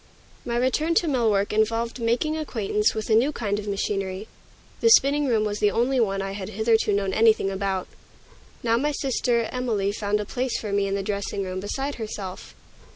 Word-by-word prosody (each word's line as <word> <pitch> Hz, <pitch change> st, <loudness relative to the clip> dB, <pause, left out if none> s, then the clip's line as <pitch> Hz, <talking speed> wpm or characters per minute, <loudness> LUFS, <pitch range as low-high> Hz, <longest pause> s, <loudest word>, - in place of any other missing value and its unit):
My 235 Hz, 0 st, -2 dB
return 300 Hz, +7 st, +1 dB
to 340 Hz, -, +3 dB
mill 250 Hz, -6 st, +2 dB
work 200 Hz, 0 st, +1 dB
involved 230 Hz, +3 st, 0 dB
making 240 Hz, +7 st, 0 dB
acquaintance 215 Hz, -9 st, 0 dB
with 220 Hz, +1 st, -3 dB
a -, -, +6 dB
new 250 Hz, +7 st, +3 dB
kind 205 Hz, -7 st, -2 dB
of 210 Hz, -, -7 dB
machinery. 195 Hz, 0 st, -2 dB, 0.5 s
The 460 Hz, -, +4 dB
spinning 290 Hz, -8 st, +5 dB
room 225 Hz, -4 st, +2 dB
was 210 Hz, -1 st, -2 dB
the 210 Hz, -, +4 dB
only 250 Hz, +5 st, +1 dB
one 195 Hz, -4 st, +1 dB
I 195 Hz, -, -4 dB
had 195 Hz, -1 st, -6 dB
hitherto 220 Hz, +1 st, +2 dB
known 200 Hz, -1 st, 0 dB
anything 220 Hz, -2 st, +3 dB
about. 195 Hz, -1 st, -2 dB, 0.8 s
Now 230 Hz, -1 st, +2 dB
my 295 Hz, +4 st, 0 dB
sister 245 Hz, -4 st, 0 dB
Emilie 225 Hz, -6 st, -1 dB
found 205 Hz, 0 st, -1 dB
a 210 Hz, -, -3 dB
place 250 Hz, +3 st, -2 dB
for 210 Hz, -2 st, -4 dB
me 200 Hz, 0 st, +1 dB
in 195 Hz, -, -1 dB
the 200 Hz, -, -2 dB
dressing 200 Hz, 0 st, -3 dB
room, 185 Hz, 0 st, -4 dB
beside 270 Hz, +8 st, -3 dB
herself. 200 Hz, -4 st, -7 dB
215 Hz, 195 wpm, -24 LUFS, 200-245 Hz, 0.8 s, a